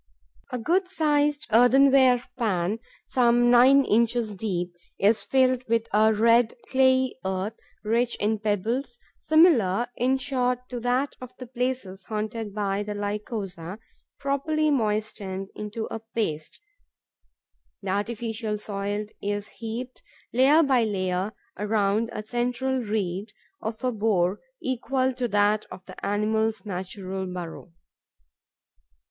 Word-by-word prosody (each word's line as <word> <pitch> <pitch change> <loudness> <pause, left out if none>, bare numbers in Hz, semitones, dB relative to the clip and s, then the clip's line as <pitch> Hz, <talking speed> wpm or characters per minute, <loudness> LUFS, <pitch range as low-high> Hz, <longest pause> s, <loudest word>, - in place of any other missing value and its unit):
A 250 - -2
good 350 - +1
sized 295 -4 +1
earthenware 255 +1 +5
pan, 210 -4 0 0.3
some 240 -1 +3
nine 260 +3 +6
inches 230 0 +1
deep, 180 -3 -3 0.2
is 210 +3 +3
filled 255 -1 +2
with 230 0 +1
a 215 +1 +5
red, 230 +2 +4
clayey 260 -1 +3
earth, 190 +3 -2 0.3
rich 235 +3 +1
in 215 +1 0
pebbles, 225 +5 -1 0.2
similar, 245 - +4
in 260 +2 +2
short, 250 -2 -1
to 245 - -4
that 250 +4 0
of 255 -1 -10
the 255 - -8
places 245 -6 -3
haunted 215 0 -4
by 200 -1 -1
the 210 0 -4
Lycosa. 205 -3 -4 0.4
Properly 300 +2 0
moistened 210 -5 -2
into 210 +1 -4
a 225 - -3
paste, 215 -9 -4 1.2
the 195 - -4
artificial 220 +1 -2
soil 205 0 -3 0.2
is 205 0 -3
heaped, 240 +3 -6 0.3
layer 275 +6 +5
by 260 -5 +3
layer, 190 -2 -1 0.3
around 210 +1 +1
a 215 - -5
central 250 +3 -1
reed, 205 -2 -3 0.3
of 220 +3 -5
a 255 - +1
bore 205 -4 +1 0.2
equal 260 +1 0
to 250 0 -2
that 205 0 +2
of 185 +1 -10
the 185 - -12
animal's 220 +1 0
natural 190 0 -5
burrow. 175 -1 -7
225 Hz, 120 wpm, -26 LUFS, 205-250 Hz, 1.2 s, nine